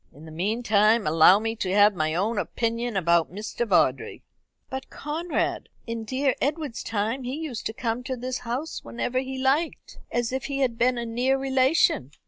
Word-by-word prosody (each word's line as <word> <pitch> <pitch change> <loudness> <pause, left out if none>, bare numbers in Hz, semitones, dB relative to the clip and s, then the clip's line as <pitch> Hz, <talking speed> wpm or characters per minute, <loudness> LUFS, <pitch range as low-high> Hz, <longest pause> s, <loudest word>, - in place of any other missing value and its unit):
In 150 +4 -14
the 160 - -10
meantime, 215 +4 +2
allow 165 +5 +6
me 225 +1 -2
to 185 -4 -2
have 205 +1 +6
my 155 -3 -1
own 205 +5 0
opinion 230 0 -2
about 170 -2 +2
Mr. 215 +4 -4
Vawdrey." 160 -9 +1 0.4
"But, 265 0 -6
Conrad, 320 +4 -3 0.2
in 230 -1 -5
dear 265 +3 +1
Edward's 290 -3 -2
time 225 +4 -2
he 255 +1 -4
used 300 -7 -4
to 220 - -5
come 230 +1 -2
to 260 -1 -3
this 255 +1 -4
house 255 +7 -4
whenever 245 +1 -2
he 265 0 -5
liked, 275 +5 -1
as 240 -1 -1
if 265 0 -3
he 275 -1 -2
had 250 -3 +1
been 250 +1 +3
a 235 - -3
near 250 +4 +1
relation. 265 - +2
235 Hz, 180 wpm, -25 LUFS, 205-265 Hz, 0.4 s, allow